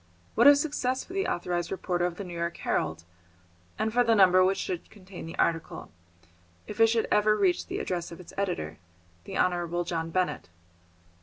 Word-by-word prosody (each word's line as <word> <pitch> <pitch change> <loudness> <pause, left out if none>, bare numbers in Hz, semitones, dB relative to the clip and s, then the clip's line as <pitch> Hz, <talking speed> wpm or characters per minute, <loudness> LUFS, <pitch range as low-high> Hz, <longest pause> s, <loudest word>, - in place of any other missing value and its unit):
What - - +5
a 285 - +10
success 280 -3 -1
for 365 - -12
the 390 0 0
authorised 175 -1 -2
reporter 180 -2 -1
of 175 - -6
the 200 - -6
New 180 -2 -8
York 170 0 -3
Herald, 80 +1 -2 0.7
and 215 0 -1
for 245 +1 +4
the 230 -1 +3
number 185 -2 +6
which 190 +1 +2
should 180 -2 -4
contain 190 -4 -11
the 165 - -8
article, 165 - -1 0.7
if 210 +1 -8
it 225 - +7
should 225 0 +1
ever 215 0 +4
reach 190 -4 +1
the - - -4
address 175 -2 -3
of 170 - -9
its 180 - -12
editor, 175 - -3 0.5
the - - -5
Honourable 175 -1 0
John 165 -1 -3
Benett! 185 +1 -1
185 Hz, 185 wpm, -28 LUFS, 170-215 Hz, 0.7 s, a